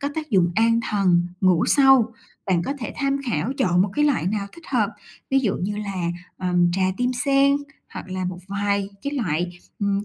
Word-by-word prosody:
có 285 - -1
tác 310 -1 -5
dụng 180 -5 +3
an 230 +2 +3
thần, 180 -4 +3
ngủ 185 -3 +3
sâu. 270 -5 +5 0.3
Bạn 180 -3 +2
có 275 - -2
thể 235 - -5
tham 275 -1 0
khảo, 235 +3 -1
chọn 180 -1 +3
một 195 - -1
cái 295 - +3
loại 285 - +1
nào 200 +1 -1
thích 335 - -15
hợp, 230 -6 +1 0.4
ví 270 - +4
dụ 220 -7 0
như 205 +3 -3
là, 190 -5 -3 0.3
ờm, 180 -1 +2
trà 190 +2 0
tim 250 +1 0
sen, 275 +2 +3 0.4
hoặc - - -7
là 185 0 -3
một 180 0 -4
vài 200 0 -1
cái 280 - -3
loại, 175 - -2 0.2
ừm, 200 -1 0
200 Hz, 205 wpm, -23 LUFS, 185-265 Hz, 0.4 s, sâu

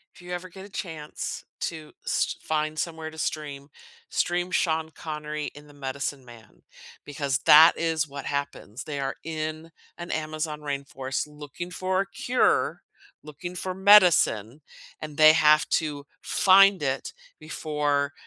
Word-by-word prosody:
If - - -16
you 180 - -10
ever 180 +1 -5
get 190 +2 -11
a - - -13
chance 160 -6 -6 0.2
to 160 -2 -5
st - - -1
find 155 0 -1
somewhere 160 -2 -4
to 160 - -13
stream, 145 -2 -4 0.4
stream 175 +1 -1
Sean 160 -3 +1
Connery 150 -1 -5
in 145 0 -14
The 145 - -16
Medicine 140 0 -4
Man, 115 -4 -16 0.4
because 140 -2 -2
that 160 +3 +9
is 160 -2 0
what 140 0 -8
happens. 140 -4 -4
They 145 -2 -5
are 135 0 -2
in 155 0 -5 0.3
an 175 0 -7
Amazon 155 -1 -3
rainforest 140 -1 -4
looking 150 +3 -8
for 185 +1 0
a - - -2
cure, 250 +1 +1 0.4
looking 175 +4 -8
for 185 +1 -3
medicine, 175 - +5 0.4
and 150 -1 -7
they 155 0 +8
have 155 -2 +5
to 145 -3 -1 0.2
find 195 -1 +5
it 135 -2 -2 0.3
before 150 -2 -1
155 Hz, 145 wpm, -26 LUFS, 145-165 Hz, 0.4 s, that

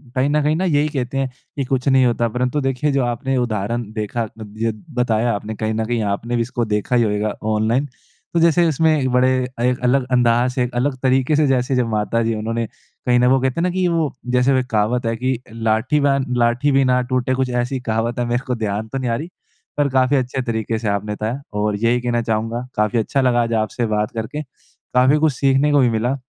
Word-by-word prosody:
कहीं 130 +2 +2
न 150 +1 +2
कहीं 150 +1 +2
ना 185 +4 0
यही 150 -4 +2
कहते 135 -2 -3
हैं 135 -1 0 0.3
कि 140 - -2
कुछ 130 +1 -1
नहीं 130 -1 +5
होता। 120 -1 +1
परंतु 125 +5 -1
देखिए 135 +2 0
जो 135 -1 +1
आपने 130 +3 -1
उदाहरण 115 -1 -2
देखा 110 +2 -3
अद 110 -1 -10
यद 115 -2 -2 0.2
बताया 115 -1 +1
आपने 105 +2 -4
कहीं 110 +1 -2
न 110 0 -1
कहीं 120 0 -1
आपने 120 +4 -4
भी 120 - +1
इसको 120 0 -2
देखा 105 +4 -1
ही 120 - +4
होएगा 105 -1 -1 0.2
ऑनलाइन। 115 +6 +1 0.5
तो 170 - +2
जैसे 170 +1 +4
उसमें 160 +1 +2
एक 130 - 0
बड़े 125 +1 +4 0.3
एक 125 0 +1
अलग 125 +2 +3
अंदाज़ 120 0 +3
से 125 - 0
एक 125 - -4
अलग 130 +3 0
तरीके 130 +3 +2
से 150 0 +3
जैसे 130 0 +1
जब 125 -2 +1
माता 110 +1 0
जी 115 0 0
उन्होंने 115 +2 -2 0.4
कहीं 125 -1 +3
ना 125 - +4
वो 130 +1 +4
कहते 130 +4 0
हैं - - +1
ना 180 - +2
कि 180 0 0
वो 165 -4 0 0.2
जैसे 125 +2 +3
वो 130 - +3
एक 130 - -2
कहावत 115 +3 0
है 115 0 0
कि, 130 +1 -1
"लाठी 115 +5 +1
बैन 140 -2 +2
लाठी 120 +4 +2
भी 135 0 +4
ना 125 0 +3
टूटे" 130 0 -1
कुछ 130 0 0
ऐसी 125 +2 -1
कहावत 115 +2 -1
है 120 - 0
मेरे 120 +2 -1
को 125 - 0
ध्यान 110 -1 -3
तो 135 - -5
नहीं 130 -2 -2
आ 115 - +1
रही। 155 +8 -5 0.5
पर 145 -1 +2
काफ़ी 130 +1 +2
अच्छे 130 0 -1
तरीके 115 -2 -2
से 110 - -4
आपने 100 +1 -2
बताया। 110 +6 -3 0.2
और 105 0 0
यही 120 +1 +2
कहना 120 -1 0
चाहूँगा 115 +2 -2
काफ़ी 105 +2 +1
अच्छा 135 +5 0
लगा 125 -2 +3
आज 115 0 -2
आपसे 115 +3 -3
बात 105 0 -1
करके। 115 +7 -4 0.5
काफ़ी 130 +4 +4
कुछ 155 - +2
सीखने 135 +3 +2
को 145 - +4
भी 125 -3 +4
मिला। 115 +4 0
125 Hz, 235 wpm, -20 LUFS, 115-135 Hz, 0.5 s, नहीं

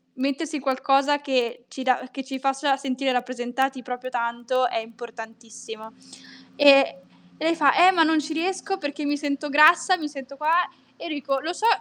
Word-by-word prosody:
mettersi 280 +4 -2
in - - -7
qualcosa 275 +2 +1
che 250 -4 -2
ci 265 - -7
dà 255 0 0
che 270 +1 -6
ci 265 0 -6
faccia 270 +1 0
sentire 270 -1 -2
rappresentati 255 +2 -2
proprio 250 +1 -6
tanto 240 +1 -1
è - - -3
importantissimo." 225 -1 -10 0.6
Ehm, 280 -2 +7 0.5
lei 325 +2 +1
fa: 285 -4 +4
"Eh, - - +8
ma 335 -3 +4
non 320 0 +3
ci 300 +2 -6
riesco 380 +4 -2
perché 290 -1 -5
mi 290 0 0
sento 290 0 -3
grassa, 315 +6 +5
mi 310 -4 -5
sento 275 -1 -10
qua." 305 +2 0 0.4
E - - -11
io 325 - -4
dico: 275 -1 -2
"Lo 325 +4 -3
so, 435 +5 -2
275 Hz, 180 wpm, -24 LUFS, 250-300 Hz, 0.6 s, Eh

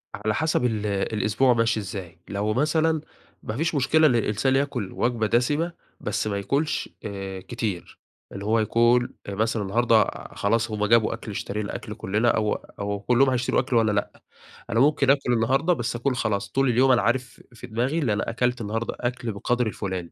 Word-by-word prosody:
على 105 +1 -1
حسب 155 -5 +1
ال 110 -3 -1
الأسبوع 105 +4 +1
ماشي 115 -1 +1
إزاي. 95 -4 -7
لو 105 +2 -1
مثلا 155 +4 +1 0.4
ما 105 - -4
فيش 160 +2 0
مشكلة 155 +3 +4
إن 125 - +2
الانسان 115 +4 +1
ياكُل 130 -8 -1
وجبة 120 -3 0
دَسِمة، 145 +9 +1 0.3
بس - - -2
ما 100 -1 -1
ياكُلش 140 +10 -1 0.2
آآ، 95 -2 -5
كتير. 100 -3 -5 0.3
اللي 100 +1 -7
هو 110 +2 +2
يكون 120 +3 +3 0.2
مثلًا 110 +2 0
النهارده 115 +2 +3 0.3
خلاص 110 +2 0
هم 105 -1 0
جابوا 115 +1 +4
أكل، 110 -1 -7
اشترينا 105 +1 -4
أكل - - -6
كلنا، 105 +5 0
أو 105 -2 +1
أو 100 0 -5
كلهم 125 +5 +3
هيتشروا 125 -1 +1
أكل 125 0 -1
وأنا 110 -2 +4
لأ. 100 0 -3 0.5
أنا 115 0 +1
ممكن 140 0 +3
آكُل 135 -3 +3
النهارده، 135 +10 +2
بس 120 -5 -3
اكون 125 +2 0
خلاص، 100 -4 -1
طول 135 -1 +2
اليوم 130 +2 +4
أنا 125 - +4
عارف 125 -1 -1
في 125 +1 -10
دماغي 125 +8 -1
اللي 125 -9 +1
أنا 105 - -2
أكلت 125 +1 0
النهارده 110 +2 -3
أكل 120 -2 -2
بالقدر 120 +4 0
الفُلاني. 95 -5 -4
115 Hz, 180 wpm, -25 LUFS, 105-125 Hz, 0.5 s, مشكلة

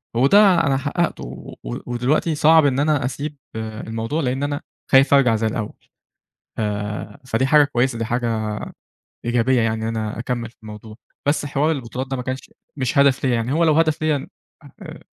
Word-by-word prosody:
وده 135 +11 +5 0.3
أنا 135 -1 +2
حققته، 150 +5 -2
و - - -9 0.3
ودلوقتي 130 +7 0
صعب 160 +1 +5
إن 135 -1 +2
أنا 145 -3 +1
أسيب 145 +3 -4 0.2
الموضوع 110 +5 -4
لإن 130 0 -1
أنا 145 0 -2 0.3
خايف 135 +1 +6
أرجع 130 -5 +5
زي 110 +1 0
الأول، 110 -1 -3 0.9
آآ 105 -1 -4
فدي 130 +1 +1
حاجة 150 +2 +6
كويسة 130 -3 0
دي 115 - -1
حاجة 110 -3 -2 0.7
إيجابية 120 +1 +2
يعني 110 0 -1
أنا 110 -1 -3
أكمل 120 -1 -3
في - - -32
الموضوع، 105 0 -10 0.3
بس 145 0 +1
حوار 145 +2 +1
البطولات 130 -3 -4
ده 135 - -1
ما 125 - -4
كانش 130 +1 -5 0.3
مش 130 -1 -1
هدف 140 -1 +4
ليّا، 130 -2 +2
يعني 115 +2 -1
هو 165 +3 +2
لو 155 -2 +4
هدف 155 -1 +2
ليّا 150 -3 0 0.5
آآ - - -9
130 Hz, 170 wpm, -21 LUFS, 115-145 Hz, 0.9 s, خايف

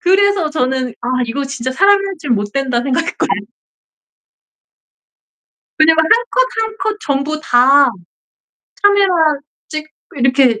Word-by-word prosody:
그래서 385 -2 +2
저는 260 -3 -1
'아 240 - -7 0.2
이거 275 +5 -3
진짜 260 -2 -4
사람이 395 +6 +3
할 390 - -5
짓 300 -3 -8
못된다.' 240 +3 -1
생각했거든 300 +6 -1 2.5
그냥 320 +1 +5
뭐 320 - +3
1 - - -3 0.2
컷 - - +2
1 445 -1 -2
컷 430 -1 -2
전부 285 +1 -2
다 270 +1 +4 0.9
카메라 405 -1 +4 0.6
찍고 310 0 -6 0.3
이렇게 255 -3 +2
290 Hz, 220 characters per minute, -16 LUFS, 260-390 Hz, 2.5 s, 그냥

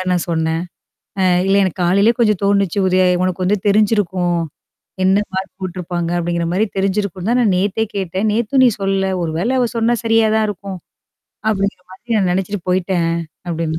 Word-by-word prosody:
அ - - -1
நான் 175 -1 0
சொன்னேன். 160 0 0 0.6
"அ - - +3 0.2
இல்ல 195 - +3
எனக்கு 185 -1 -2
காலைலயே 200 +6 +3
கொஞ்சம் 210 -4 +2
தோணுச்சு. 200 -1 +1
ஒரு 185 - +2 0.2
உனக்கு 185 0 -1
வந்து 205 +2 +1
தெரிஞ்சிருக்கும். 190 -5 +1 0.7
என்ன 190 +1 +4
மார்க் 190 +1 -4
போட்டுருப்பாங்க 175 -2 -4
அப்டிங்கிற 170 0 -1
மாரி 190 +5 +2
தெரிஞ்சிருக்கும்னு 195 0 -1
தான் 245 - +2
நான் 225 -4 +3
நேத்தே 200 +4 0
கேட்டேன். 190 +1 -2
நேத்தும் 235 +4 +2
நீ - - +7
சொல்லல. 195 0 0
ஒரு 165 - -2
வேள 205 +8 0
அவ 250 - +3
சொன்னா 230 +1 +2
சரியா 225 0 +3
தான் 220 - +2
இருக்கும். 195 -1 -6 0.7
அப்டிங்கிற 200 -3 -1
மாதிரி 230 +5 -5
நான் 190 - +1
நெனச்சுட்டு 190 +2 -1
போயி்ட்டேன்.", 180 -2 0 0.4
அப்டின்னு. 165 -1 -2
190 Hz, 170 wpm, -18 LUFS, 175-210 Hz, 0.7 s, நீ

